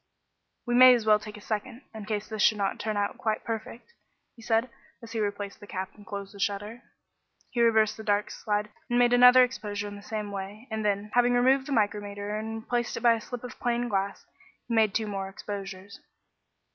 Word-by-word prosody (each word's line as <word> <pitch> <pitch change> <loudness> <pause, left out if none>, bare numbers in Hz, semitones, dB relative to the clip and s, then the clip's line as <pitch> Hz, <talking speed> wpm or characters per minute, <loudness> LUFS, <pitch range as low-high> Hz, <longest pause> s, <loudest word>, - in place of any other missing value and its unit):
"We 240 - -1
may 255 +1 +9
as 230 -3 -2
well 215 -1 +5
take 210 0 -9
a - - -12
second, 230 +5 -4
in 220 -2 -8
case 210 -1 -3
this 215 -1 -4
should 215 - +4
not 200 -1 -1
turn 215 -1 -2
out 205 0 -1
quite 220 -1 -1
perfect," 230 - -6 0.4
he 235 - -15
said, 225 +2 +1 0.3
as 230 -2 -12
he 225 - -3
replaced 205 -1 -3
the 205 - -12
cap 190 -2 -5
and 205 -2 -17
closed 200 -1 -6
the 200 - -12
shutter. 205 +4 -3 0.7
He 240 - 0
reversed 220 -2 +3
the 220 - -8
dark 205 -1 0
slide 210 0 -2 0.2
and 240 - +1
made 245 0 +4
another 250 +1 +8
exposure 205 -5 -3
in 205 - -7
the 200 - -10
same 210 -1 -5
way, 200 +4 -7
and 220 0 -2
then, 205 0 -1
having 245 0 +4
removed 260 +2 +3
the - - -5
micrometer 205 -2 -1
and 220 +1 -5
replaced 240 0 -2
it - - -5
by 235 -1 +6
a 225 - -3
slip 245 +2 -7
of 250 - -9
plain 240 0 0
glass, 195 -1 -2 0.4
he 235 - -3
made 220 -3 +3
two 220 - +1
more 195 -2 -4
exposures. 195 0 -7
215 Hz, 215 wpm, -28 LUFS, 205-235 Hz, 0.7 s, may